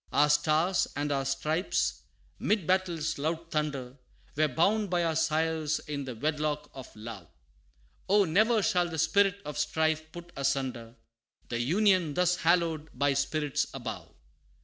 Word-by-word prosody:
Our 150 +1 +4
Stars 155 +5 +2
and 145 0 -2
our 135 -1 0
Stripes 150 +6 -1 0.4
'mid 210 -5 +1
battle's 175 -4 0
loud 165 +3 -3
thunder, 140 -4 -3 0.4
Were 155 +1 +3
bound 195 - +1
by 175 -1 +1
our 165 -1 0
sires 160 -1 +1
in 145 -2 -5
the 130 -2 -6
wedlock 150 +3 -2
of 130 -2 -9
love 105 -5 -9 0.8
Oh! 205 0 +5
ne'er 215 +6 +3
shall 175 -2 +2
the 165 - -5
spirit 195 +5 +3
of 150 0 -5
strife 155 0 0
put 175 0 -10
asunder, 130 -4 -2 0.5
The 120 - -2
UNION 175 - +2
thus 180 0 +2
hallowed 165 -2 +1
by 140 +1 +2
spirits 145 +1 0
above. 110 -9 -6
155 Hz, 145 wpm, -29 LUFS, 140-175 Hz, 0.8 s, Oh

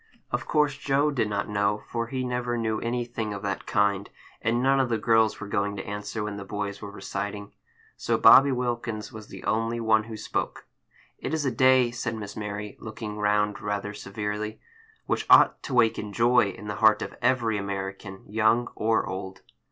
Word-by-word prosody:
Of - - -2
course 150 -3 +2
Joe 140 +2 +2
did 120 -6 0
not 100 -1 -2
know, 105 0 0
for 115 -1 -3
he 130 +1 -3
never 125 -1 -2
knew 110 -2 -1
anything 115 -3 -3
of 100 - -8
that 100 -1 -3
kind; 100 -1 +1 0.3
and 120 +3 +1
none 135 +1 +4
of 130 -2 +1
the 115 - +1
girls 110 0 +3
were 100 - -6
going 100 0 -1
to 100 - -6
answer 105 +1 -4
when 105 -1 -4
the 100 - -6
boys 100 0 -4
were 100 - -6
reciting. 100 +1 -5 0.4
So - - 0
Bobby 135 +1 +8
Wilkins 120 -4 -3
was 110 -1 -9
the - - -10
only 115 +1 0
one 110 -1 +3
who 110 -1 -7
spoke. - - -3 0.5
"It 150 - -2
is 155 -2 -1
a 135 - +1
day," 130 0 +4
said 120 -1 -3
Miss 105 -2 -7
Mary, 105 0 -5
looking 110 -1 -7
round 105 0 +1
rather 105 0 -3
severely, 105 +1 -4 0.5
"which - - -1
ought - - +7
to 130 - -4
waken 110 -3 +2
joy 120 0 +4
in 100 - -9
the 105 -1 -4
heart 110 -1 +5
of - - -7
every 115 -4 +2
American, 95 0 -5
young 110 +3 +2
or 110 +1 +1
old." 95 0 -6
110 Hz, 190 wpm, -26 LUFS, 105-120 Hz, 0.5 s, Bobby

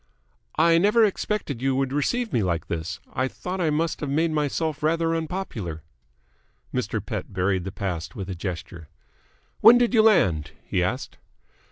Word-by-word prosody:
"I 165 +1 +5
never 210 +5 +5
expected 195 - -2
you 135 0 +1
would 135 0 0
receive 230 - 0
me 115 - +2
like 85 -3 -1
this. 85 +1 -3
I 130 +1 0
thought 180 +7 -5
I 165 - +2
must 155 +2 0
have 145 - -3
made 160 +4 +1
myself 155 +1 -1
rather 165 +1 +1
unpopular." 150 - -4 0.9
Mr. - - -2
Pett - - -5
buried 95 -1 0
the 95 - -4
past 85 -5 -4
with 95 - -5
a 95 - -4
gesture. 85 -3 -6 0.7
"When 235 +2 +9
did 240 0 +2
you 225 - +6
land?" 130 - +3
he 90 - 0
asked. 125 +9 -3
140 Hz, 165 wpm, -25 LUFS, -, 0.9 s, When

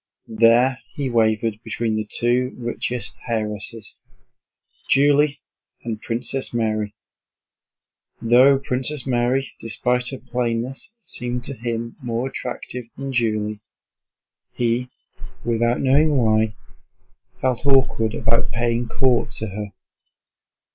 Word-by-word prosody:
There 115 +3 +4 0.2
he 135 -3 -2
wavered 110 -1 +1
between 115 0 -1
the 110 -1 -3
two 125 +2 +1
richest 120 0 -3
heiresses, 110 -1 -3 1.0
Julie 145 +1 +4 0.4
and 110 -2 -4
Princess 120 +3 -1
Mary. 110 -2 -1 1.2
Though 125 +4 +6
Princess 135 +1 -1
Mary 130 +1 +1
despite 125 +2 0
her 135 - -2
plainness 125 - -2
seemed 125 -7 -3
to 140 - -3
him 115 -1 -4
more 120 0 -2
attractive 125 -1 -5
than 135 -1 -4
Julie, 110 -3 0 0.9
he, 120 +1 0 0.6
without 120 +1 +1
knowing 145 +2 +4
why, 110 -2 +2 0.8
felt 130 -2 0
awkward 130 -5 +3
about 115 0 +1
paying 120 0 0
court 130 +1 +2
to 110 -1 -3
her. 100 +1 -5
120 Hz, 105 wpm, -22 LUFS, 115-130 Hz, 1.2 s, Though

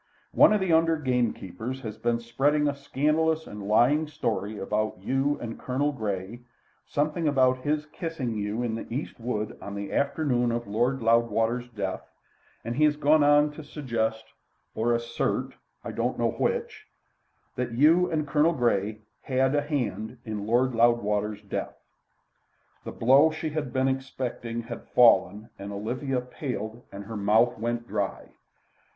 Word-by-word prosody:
"One - - +6
of 210 - +3
the 190 -3 +1
under 165 0 +4
gamekeepers 125 - -2
has 110 -4 -6
been 120 0 0
spreading 140 +6 +1
a 145 - +1
scandalous 155 +3 0
and 105 -1 -8
lying 130 +9 +3
story 110 -8 -3
about 105 +1 -1
you 135 +8 0
and 115 -1 -6
Colonel 140 +3 0
Grey, 105 -3 -4 0.5
something 150 +3 0
about 130 -3 +3
his 150 +3 -1
kissing 155 -6 -4
you 105 +2 -2
in 115 -2 -1
the 115 - -6
East 130 +2 -4
wood 110 -3 -3
on 100 - -7
the 100 0 -5
afternoon 140 -4 +1
of 120 0 -2
Lord 120 +5 0
Loudwater's 115 +1 +2
death, 110 -4 -4 0.6
and 115 +1 -3
he 155 - +3
has 150 -1 +3
gone 150 +1 +4
on 145 +1 +5
to 155 +1 -10
suggest, 115 -7 -2 0.5
or 115 +2 0
assert 115 0 -2 0.3
I - - -5
don't - - -1
know - - +1
which - - -2 0.7
that 125 -1 -3
you 160 +8 +4
and 155 -2 -1
Colonel 155 +3 +3
Grey 110 -5 0 0.2
had 130 0 +1
a 145 - +2
hand 125 -6 -3
in 105 -2 -4
Lord 125 +3 +2
Loudwater's 105 -3 +1
death." 100 - -4 1.1
The - - -5
blow 135 +6 +5
she 160 0 -4
had 150 -4 -3
been 130 +1 +1
expecting 130 -3 -3
had 115 - -8
fallen, 105 -3 +4
and 100 +1 -6
Olivia 125 +6 -2
paled 125 -3 -5
and 100 +1 -7
her 110 +2 -8
mouth 110 +4 +3
went 120 +1 -2
dry. 100 -1 -3
120 Hz, 155 wpm, -27 LUFS, 110-145 Hz, 1.1 s, One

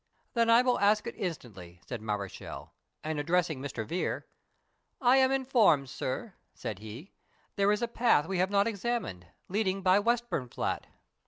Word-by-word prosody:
"Then 230 -1 +2
I 230 +2 +7
will 250 -1 +2
ask 210 +1 +3
it - - -4
instantly," 100 - -6
said 115 +6 -5
Mareschal; 105 -3 -5 0.3
and, 155 -1 -2
addressing 160 -2 +1
Mr. 135 -5 -4
Vere, 175 +10 -2 0.7
"I 255 0 +5
am 265 0 +4
informed, 235 - +3
sir," 155 - -4 0.2
said 105 -4 -5
he, 110 - -9 0.4
"there 200 0 +3
is 210 +3 0
a - - +1
path 230 -10 +3
we 190 -1 -1
have 185 +1 +2
not 200 0 +3
examined, 220 - -3 0.2
leading 195 -1 -1
by 185 +1 +5
Westburnflat." 220 - -1
190 Hz, 155 wpm, -30 LUFS, -, 0.7 s, I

